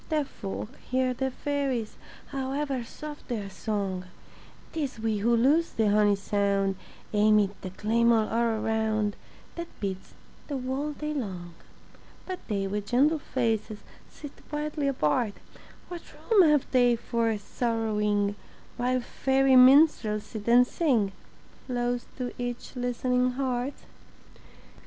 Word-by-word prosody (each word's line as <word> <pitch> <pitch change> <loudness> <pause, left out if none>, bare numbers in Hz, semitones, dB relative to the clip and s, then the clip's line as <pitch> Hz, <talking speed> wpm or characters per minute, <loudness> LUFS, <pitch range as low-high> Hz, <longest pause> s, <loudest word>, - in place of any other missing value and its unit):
Deaf 305 -3 0
folk 200 -2 -6 0.2
hear 255 0 +1
the 265 +2 -1
fairies, 270 -5 -2 0.3
However 270 -1 -2
soft 295 +5 -9
their 210 -5 -4
song; 195 -3 -3 0.7
Tis 285 -7 -3
we 220 -2 0
who 235 +3 +3
lose 295 +8 +3
the 215 -2 +2
honey 205 -1 +4
sound 200 -1 0 0.4
Amid 210 -1 +4
the 185 - -5
clamor 225 +3 +2
all 230 -1 +1
around 220 -2 0 0.4
That 340 0 -4
beats 190 -2 -5 0.3
the 285 - -3
whole 265 +4 -2
day 300 +1 -4
long. 185 - -5 0.7
But 370 -1 -5
they 200 -3 -1
with 205 +1 -3
gentle 290 +8 +3
faces 225 -5 -2 0.3
Sit 290 -2 -10 0.2
quietly 295 -1 -2
apart; 215 - +1 0.5
What 350 -1 -7
room 390 -8 +4
have 295 -3 +3
they 245 -2 +4
for 230 -1 -1
sorrowing 210 -2 0 0.4
While 250 +1 +1
fairy 265 +2 +2
minstrels 255 -5 +6
sit 215 -2 -8
and 245 +1 +7
sing 250 - +1 0.6
Close 245 -1 -1
to 250 -1 -3
each 245 +2 -5
listening 250 0 0
heart? 260 0 -2
240 Hz, 125 wpm, -27 LUFS, 210-270 Hz, 0.7 s, and